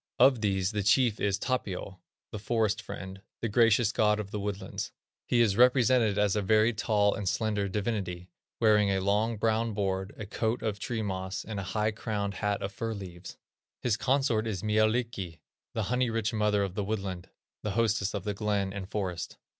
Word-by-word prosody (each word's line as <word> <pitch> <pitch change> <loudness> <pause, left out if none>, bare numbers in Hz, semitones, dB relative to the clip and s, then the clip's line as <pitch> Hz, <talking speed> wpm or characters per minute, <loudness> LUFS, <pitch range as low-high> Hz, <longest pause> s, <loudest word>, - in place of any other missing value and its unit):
Of 130 -4 +5
these 95 -2 +1
the 105 -1 -1
chief 110 +2 +3
is 100 -1 +1
Tapio, 100 -5 -3 0.3
"The 105 - -5
Forest 110 -1 0
Friend," 95 -2 -8 0.2
"The 115 - -1
Gracious 115 0 +4
God 105 -1 +2
of 100 -2 -5
the 105 - -3
Woodlands." 100 -1 -4 0.4
He 120 - +3
is 105 -4 +3
represented 125 -4 +4
as 105 -1 +2
a 105 - +1
very 110 +3 +3
tall 105 -1 +2
and 100 -3 -2
slender 105 -3 0
divinity, 95 -4 -3 0.3
wearing 105 -3 +4
a 95 -1 +1
long, 105 +4 +1
brown 110 +1 +1
board, 95 -1 -2
a 110 - -5
coat 110 +3 -2
of 105 -2 -2
tree 115 -2 -2
moss, 95 -1 -3
and 110 -2 -4
a 95 - -5
high 105 +1 +2
crowned 105 -2 -3
hat 105 -1 -1
of 100 - -3
fir 115 +2 -3
leaves. 90 -3 -9 0.5
His 120 -4 +2
consort 130 -4 +1
is 100 -4 -3
Mielikki, 110 -4 0 0.4
"The 110 - 0
Honey 125 +3 +1
rich 115 0 -1
Mother 105 -2 +2
of 95 -2 -3
the 100 +1 -2
Woodland," 95 -4 -4 0.3
"The 105 - -3
Hostess 110 -3 +1
of 100 - -3
the 105 - -2
Glen 100 -1 -1
and 100 -1 -6
Forest." 95 -5 -3
105 Hz, 185 wpm, -29 LUFS, 100-110 Hz, 0.5 s, Of